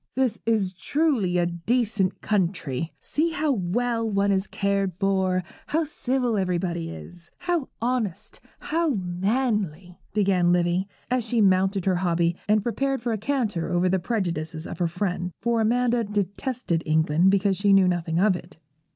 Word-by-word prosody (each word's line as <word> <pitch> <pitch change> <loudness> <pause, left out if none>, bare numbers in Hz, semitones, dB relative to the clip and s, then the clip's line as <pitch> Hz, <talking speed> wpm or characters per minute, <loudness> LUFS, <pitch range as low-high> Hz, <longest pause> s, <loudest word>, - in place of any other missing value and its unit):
'This 255 -4 +1
is 205 -5 +1
truly 230 - +1
a 175 - +3
decent 200 +3 0
country. 170 -7 -1
See 325 +2 -1
how 310 -2 +1
well 230 +2 0
one 200 -1 +2
is 195 0 +1
cared 200 -2 0
for, 190 -1 +1 0.2
how 320 +2 +1
civil 255 -6 -1
everybody 175 -2 -1
is, 175 +1 -10
how 345 -6 -1
honest, 235 -7 -2 0.2
how 325 -4 0
manly,' 190 - -1
began 190 -4 +2
Livy, 175 +2 +1 0.2
as 250 -1 +2
she 235 +1 0
mounted 190 -1 +3
her 185 -2 +2
hobby, 170 -1 +1
and 210 -1 +4
prepared 270 +4 -1
for 235 +1 -2
a 220 - 0
canter 215 -9 -1
over 175 +1 +2
the 190 +1 +2
prejudices 170 -6 -2
of 170 - -7
her 175 - +2
friend; 180 0 -2
for 235 -1 +1
Amanda 240 +1 +2
detested 205 -1 -2
England 160 +3 +3
because 195 0 +2
she 200 +1 +2
knew 195 -1 +6
nothing 170 -2 0
of 195 0 +4
it. 175 0 -10
195 Hz, 155 wpm, -25 LUFS, 175-235 Hz, 0.2 s, knew